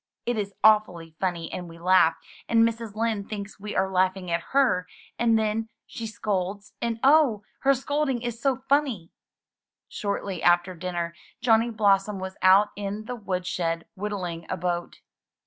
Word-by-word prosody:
It 240 - 0
is 200 -2 -3
awfully 180 -7 +3
funny 175 -3 -2
and 180 -1 -5
we 165 - -12
laugh; 170 -1 +4 0.3
and 230 0 +5
Mrs. 230 -2 -5
Lind 220 -2 -1
thinks 205 -1 -6
we 210 +1 -6
are 190 - +2
laughing 185 -1 0
at 170 0 -1
her, 240 -10 +2 0.3
and 230 -1 +4
then 220 +1 -1 0.2
she 230 -2 -6
scolds, 200 -2 -3
and 230 -1 -1
oh! 270 -7 +5 0.2
her 275 0 +4
scolding 270 -2 -1
is 240 -1 -4
so 265 -2 0
funny!" 270 - +1 0.8
Shortly 200 -3 -3
after 175 +1 +3
dinner 175 -1 -4 0.3
Johnny 230 -1 +3
Blossom 205 -2 +2
was 190 0 -6
out 195 +3 +6
in 205 +1 -4
the 250 - -4
wood 185 -5 -3
shed 165 -2 -2
whittling 185 -5 -4
a 185 - -2
boat. 175 0 -3
200 Hz, 160 wpm, -26 LUFS, 180-230 Hz, 0.8 s, out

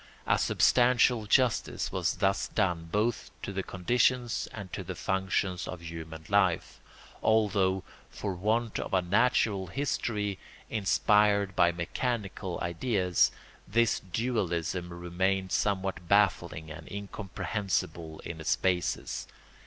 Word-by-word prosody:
A - - +3
substantial 120 -2 +4
justice 125 0 +2
was - - 0
thus 95 0 +1
done 90 -5 -1
both 110 +3 0
to 100 - -4
the 95 - -1
conditions 120 +6 +1
and 100 -5 -8
to - - -4
the - - -6
functions 95 -1 -1
of 90 -2 -6
human 80 -1 -8
life, 95 -4 +1 0.4
although, 100 -4 +2 0.3
for 100 -2 -4
want 110 +5 0
of - - -2
a 90 - +2
natural 100 0 +2
history 105 -4 -2 0.3
inspired 100 0 +3
by 85 -1 +5
mechanical 95 +1 -3
ideas, 90 0 +2 0.4
this 115 +3 +2
dualism 90 -5 -2
remained 95 +2 -1
somewhat 95 -3 -1
baffling 85 -6 +2
and 80 +1 -10
incomprehensible 95 -5 -3
in 80 -2 -7
its 80 - +2
basis. 90 -2 -1
95 Hz, 115 wpm, -29 LUFS, 90-105 Hz, 0.4 s, by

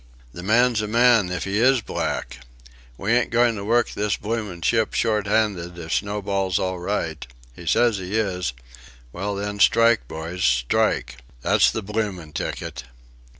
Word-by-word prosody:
"The 90 - -8
man's 115 +3 +3
a 105 - -3
man 115 -3 +4
if 90 - -2
he 100 +2 -1
is 130 +1 +4
black." 60 - -4 0.6
"We 100 - -2
ain't 120 0 +2
goin' 120 0 +3
to 100 - -5
work 115 +3 +2
this 105 0 -1
bloomin' 105 -6 -4
ship 110 +4 +1
shorthanded 105 -5 0
if 80 -1 -5
Snowball's 100 -2 -1
all 95 -2 -2
right..." 85 -5 -3 0.3
"He 85 - -11
says 115 +4 +3
he 95 +3 -4
is." 90 - -1 0.6
"Well 100 +3 -3
then, 100 +1 -4
strike, 115 +2 +4
boys, 80 +3 -5
strike!" - - +1 0.3
"That's - - +4
the 110 - -4
bloomin' 95 -7 -3
ticket." 65 - -5
100 Hz, 150 wpm, -23 LUFS, 90-110 Hz, 0.6 s, man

